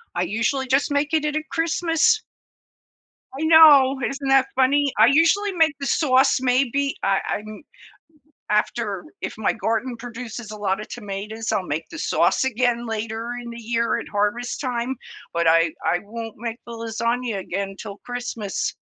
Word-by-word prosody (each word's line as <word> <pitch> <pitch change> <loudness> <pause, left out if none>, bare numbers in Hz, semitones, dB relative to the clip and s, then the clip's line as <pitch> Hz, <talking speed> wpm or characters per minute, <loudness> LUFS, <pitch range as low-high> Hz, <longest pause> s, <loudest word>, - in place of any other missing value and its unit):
I 175 - +1
usually 225 +8 -1
just 270 +4 +2
make 285 +2 0
it 305 -1 +2
it 300 0 -1
at 310 0 -3
Christmas. 335 +6 +2 1.2
I - - -2
know, 290 -5 +7
isn't 275 0 -5
that 270 0 +5
funny? 275 +1 +3
I 220 +2 +7
usually 330 +8 +3
make 320 -5 +2
the 275 - -4
sauce, 265 -4 +3
maybe 270 +2 +1
I 195 0 +2
I'm 215 +3 -5 0.9
after 210 -2 0 0.2
if - - -4
my 220 - +1
garden 230 +2 -2
produces 235 -2 -8
a 215 - -8
lotta 200 +1 -1
tomatoes, 215 0 -5
I'll 185 -3 -1
make 150 +3 -3
the 330 - -9
sauce - - +2
again 240 -1 0
later 225 +1 -4
in 235 - -8
the 235 0 -8
year 230 +1 0
at - - -7
harvest 210 +4 -1
time, 250 -1 -2 0.4
but 170 0 0
I 165 0 +4
I 175 - +1
won't 225 +1 -7
make 235 0 -5
the 235 - -8
lasagna 230 0 -2
again 195 +1 -4
'til 205 -2 -8
Christmas. 245 -4 -3
235 Hz, 160 wpm, -23 LUFS, 215-275 Hz, 1.2 s, know